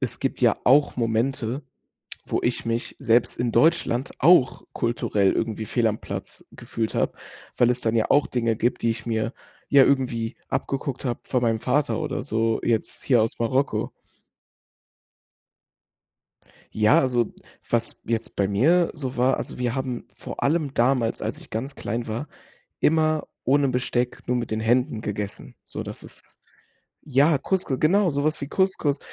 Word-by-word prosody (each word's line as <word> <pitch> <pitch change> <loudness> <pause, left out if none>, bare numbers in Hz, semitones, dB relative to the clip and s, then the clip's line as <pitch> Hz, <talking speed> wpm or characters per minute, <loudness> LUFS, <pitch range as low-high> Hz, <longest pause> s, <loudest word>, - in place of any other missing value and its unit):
es - - -3
gibt - - -2
ja - - +4
auch 145 +3 +4
Momente, 120 +3 -1 0.7
wo - - 0
ich - - -1
mich 115 0 -2
selbst 115 +1 +2
in 120 -1 0
Deutschland 150 -6 +2
auch 160 -4 +5
kulturell 105 -4 +1
irgendwie 110 -1 -2
fehl 115 +1 +1
am 105 0 -1
Platz - - -7
gefühlt 110 -1 -4
habe, - - 0 0.4
weil 120 0 +4
es 125 0 -4
dann 115 0 0
ja 110 - +2
auch 145 - +4
Dinge 115 -2 0
gibt, 120 +3 -1
die 115 - +3
ich 110 +1 -6
mir 115 +1 -1 0.4
ja 140 - +7
irgendwie 125 -4 0
abgeguckt 135 0 -3
habe 120 -3 -2
von 125 - -1
meinem 115 -2 +1
Vater 145 +7 0
oder 155 - -3
so 115 -3 0
jetzt 115 -2 -1
hier 120 -5 +4
aus 115 - -3
Marokko. 130 +4 0 2.8
Ja, 110 0 +4
also 120 -3 +1 0.4
was 115 -1 -1
jetzt 115 0 -2
bei 100 - +1
mir 160 - +3
so 135 -5 -5
war 130 +2 +3
also - - -5
wir 125 0 -1
haben 130 -3 -4
vor - - -7
allem 150 -2 +1
damals, 120 -1 +1
als - - -3
ich - - -13
ganz 135 +5 -4
klein 115 +1 -4
war, 115 +7 -4 0.5
immer 155 0 +2 0.2
ohne 140 +2 +3
Besteck 125 -1 -1
nur 125 - +1
mit 120 -2 -3
den 110 0 -1
Händen 120 +2 +1
gegessen, 105 -2 -4
sodass - - -6
es - - -10 0.6
ja, 145 +2 +3
Couscou 180 -5 -1
genau 185 +4 +4
so 145 -1 -1
was 155 0 0
wie 140 - -3
Couscous, 185 -7 +1
125 Hz, 160 wpm, -24 LUFS, 115-140 Hz, 2.8 s, ja